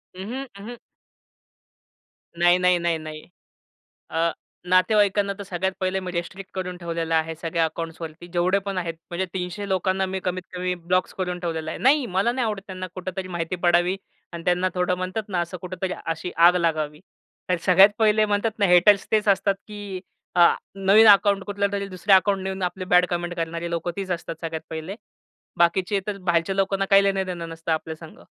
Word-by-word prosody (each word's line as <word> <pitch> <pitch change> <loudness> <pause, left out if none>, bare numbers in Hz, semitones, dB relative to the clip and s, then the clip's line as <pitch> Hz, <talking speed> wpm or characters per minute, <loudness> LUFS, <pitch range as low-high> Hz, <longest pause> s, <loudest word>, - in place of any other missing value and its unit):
अंह, 225 +9 -5 0.2
अंह. 235 +4 -8 1.6
नाही, 175 +1 +5
नाही, 180 0 +3
नाही, 170 -1 0
नाही. 155 -1 -9 0.8
अ, 165 +1 +1 0.4
नातेवाईकांना, 200 +1 +3
तर 200 - -6
सगळ्यात 190 0 -2
पहिले 190 0 0
मी 185 -1 -5
रिस्ट्रिक्ट 185 +3 -5
करून 180 -1 -4
ठेवलेलं 165 -1 -3
आहे, 160 0 0
सगळ्या 165 +1 -1
अकाउंट्सवरती 165 +1 -6
जेवढे 180 +3 +2
पण 195 -1 -3
आहेत. 170 -2 -2 0.2
म्हणजे 175 +2 -2
300 185 +2 -4
लोकांना 190 0 +1
मी 190 0 -3
कमीतकमी 180 0 -3
ब्लॉक्स 180 +1 -1
करून 180 -1 -3
ठेवलेलं 160 -2 -3
आहे. - - -5
नाही 275 +1 +4
मला 200 +5 +3
नाही 250 0 -1
आवडतं 210 -3 -3
त्यांना 185 -1 -6
कुठेतरी 185 0 -5
माहिती 175 0 -3
पडावी. 175 +2 +3 0.4
आणि 170 0 -6
त्यांना 180 +1 +2
थोडं 180 0 +1
म्हणतात 185 +4 -3
ना, 185 -3 -1
असं 175 +1 -5
कुठेतरी 185 0 -4
अशी 165 +2 -3
आग 180 +1 +7
लागावी. 155 -3 -1 0.5
तर 180 - +2
सगळ्यात 190 +3 +7
पहिले 215 0 +4
म्हणतात 210 +2 0
ना 200 - +4
हेटर्स 185 +2 +5
तेच 215 -1 +2
असतात. 200 0 +3
की 205 -3 -7 0.3
आ 175 -1 +6 0.2
नवीन 195 +3 +5
अकाउंट 200 -1 +5
कुठल्यातरी 200 -1 -1
दुसऱ्या 190 +1 +3
अकाउंट 195 0 0
नेऊन 190 0 -4
आपले 180 +1 -3
बॅड 180 0 +6
कमेंट 175 0 -2
करणारे 170 0 -3
लोकं 170 +1 -2
तीच 195 -2 -4
असतात 165 -1 -4
सगळ्यात 160 -1 -4
पहिले. 160 +5 -5 0.6
बाकीचे 185 +4 +2
तर 205 -1 -3
बाहेरच्या 175 0 0
लोकांना 195 0 +1
काही 195 0 +6
लेण-देणं 185 -4 -1
नसतं 165 0 -5
आपल्या 160 0 -2
संग. 160 0 -13
185 Hz, 175 wpm, -24 LUFS, 170-195 Hz, 1.6 s, आग